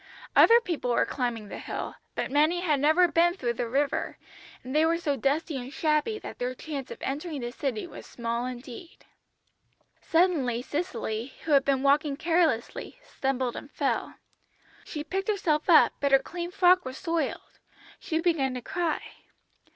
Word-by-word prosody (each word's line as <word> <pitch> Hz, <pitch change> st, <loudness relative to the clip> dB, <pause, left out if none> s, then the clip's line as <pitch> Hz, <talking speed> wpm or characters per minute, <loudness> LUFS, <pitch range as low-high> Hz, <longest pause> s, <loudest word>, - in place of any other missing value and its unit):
"Other 465 Hz, +1 st, +8 dB
people 340 Hz, -, -3 dB
were 240 Hz, -, +3 dB
climbing 240 Hz, -5 st, -3 dB
the -, -, -7 dB
hill, -, -, -5 dB, 0.2 s
but -, -, -2 dB
many 310 Hz, +5 st, +3 dB
had 305 Hz, -6 st, +1 dB
never 315 Hz, +5 st, +5 dB
been 345 Hz, +1 st, +3 dB
through 240 Hz, -9 st, -1 dB
the 235 Hz, 0 st, -3 dB
river, 280 Hz, +3 st, -1 dB, 0.5 s
and 260 Hz, +3 st, -6 dB
they 310 Hz, -, +5 dB
were 330 Hz, +1 st, +3 dB
so 300 Hz, -4 st, -1 dB
dusty 280 Hz, +4 st, 0 dB
and 255 Hz, +1 st, -6 dB
shabby 305 Hz, +8 st, +1 dB
that -, -, -9 dB
their 250 Hz, +1 st, -2 dB
chance 280 Hz, -2 st, -6 dB
of -, -, -7 dB
entering 295 Hz, +2 st, -3 dB
the 240 Hz, 0 st, -4 dB
city 250 Hz, -4 st, -3 dB
was -, -, -11 dB
small 235 Hz, +1 st, -3 dB
indeed. 255 Hz, +6 st, -9 dB, 1.0 s
Suddenly 300 Hz, -9 st, +2 dB
Cicely, 250 Hz, -6 st, -3 dB
who 320 Hz, -, -3 dB
had 280 Hz, -2 st, +6 dB
been 270 Hz, -1 st, +1 dB
walking 285 Hz, 0 st, +3 dB
carelessly, 330 Hz, -, 0 dB
stumbled 265 Hz, -, -2 dB
and 280 Hz, -, -8 dB
fell. -, -, -2 dB, 0.7 s
She 300 Hz, -2 st, -5 dB
picked 385 Hz, +4 st, -3 dB
herself 335 Hz, -8 st, 0 dB
up, 330 Hz, -, +7 dB
but 280 Hz, -1 st, +1 dB
her 270 Hz, -, +8 dB
clean 345 Hz, +5 st, -6 dB
frock 365 Hz, -1 st, +4 dB
was 260 Hz, -2 st, -6 dB
soiled. 330 Hz, -2 st, -3 dB, 0.4 s
She 320 Hz, -, -2 dB
began 315 Hz, -7 st, +1 dB
to 250 Hz, -, -4 dB
cry. 340 Hz, -3 st, -1 dB
290 Hz, 165 wpm, -27 LUFS, 255-335 Hz, 1.0 s, Other